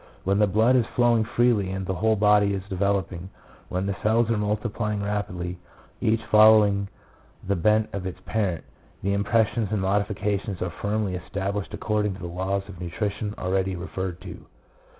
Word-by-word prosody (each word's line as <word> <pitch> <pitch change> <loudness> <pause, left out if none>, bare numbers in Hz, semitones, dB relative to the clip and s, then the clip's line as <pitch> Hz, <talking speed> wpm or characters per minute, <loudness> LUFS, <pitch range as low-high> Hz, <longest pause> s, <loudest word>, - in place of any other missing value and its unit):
When 100 +2 +1
the 105 - +4
blood 110 +6 +3
is 120 -3 +3
flowing 120 -2 +4
freely 115 -4 +2
and 95 0 -3
the 95 - -2
whole 110 +4 +2
body 105 -1 +4
is 95 - -4
developing, 95 -2 -1 0.4
when 90 +1 -2
the 100 0 -1
cells 115 +1 +2
are 115 - +1
multiplying 105 0 -2
rapidly, 90 -4 -3 0.4
each 110 +1 +1
following 105 -2 +6 0.6
the 100 - +1
bent 105 +5 +2
of 95 -2 -3
its 90 -1 -7
parent, 95 -8 -1 0.4
the 100 +1 +1
impressions 110 +2 +1
and 105 - 0
modifications 100 0 -1
are 90 - -2
firmly 105 -2 -1
established 100 +2 -4
according 105 -2 -1
to - - -12
the 85 - -6
laws 95 +3 -2
of 90 -3 -10
nutrition 105 +4 -3
already 95 0 -1
referred 90 0 -5
to. 90 -3 -9
100 Hz, 165 wpm, -25 LUFS, 95-105 Hz, 0.6 s, following